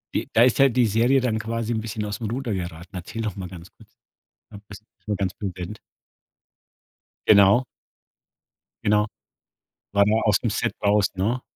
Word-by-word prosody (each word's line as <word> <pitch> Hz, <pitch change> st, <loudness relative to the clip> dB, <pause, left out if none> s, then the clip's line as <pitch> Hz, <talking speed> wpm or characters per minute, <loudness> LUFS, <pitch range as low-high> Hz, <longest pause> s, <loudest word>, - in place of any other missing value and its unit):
De -, -, -1 dB
da 115 Hz, -, +6 dB
ist 125 Hz, -4 st, +3 dB
halt 135 Hz, -3 st, +5 dB
die 125 Hz, -, +5 dB
Serie 120 Hz, +6 st, +3 dB
dann 125 Hz, -4 st, 0 dB
quasi 115 Hz, +1 st, -3 dB
’n 110 Hz, -, -1 dB
bisschen 110 Hz, -1 st, -4 dB
aus’m 105 Hz, +1 st, -4 dB
Ruder 120 Hz, -2 st, -3 dB
geraten. 85 Hz, 0 st, -6 dB
Erzähl 95 Hz, +6 st, -6 dB
noch 105 Hz, -3 st, -3 dB
mal 95 Hz, -2 st, -6 dB
ganz 90 Hz, -2 st, -11 dB
kurz. -, -, -20 dB, 0.6 s
Am 100 Hz, -, -11 dB
besten 100 Hz, +2 st, -12 dB, 0.2 s
vom 105 Hz, -, -1 dB
ganzen 95 Hz, +1 st, -3 dB
Event. 90 Hz, +3 st, -7 dB, 1.5 s
Genau. 100 Hz, +4 st, +6 dB, 1.2 s
Genau. 105 Hz, 0 st, +3 dB, 0.9 s
War 100 Hz, 0 st, +5 dB
der 110 Hz, +2 st, +1 dB
aus 105 Hz, -2 st, +4 dB
dem 120 Hz, -, -1 dB
Set 105 Hz, -, -1 dB
raus, 105 Hz, -1 st, +3 dB
ne? 110 Hz, +7 st, -1 dB
105 Hz, 165 wpm, -24 LUFS, 100-115 Hz, 1.5 s, da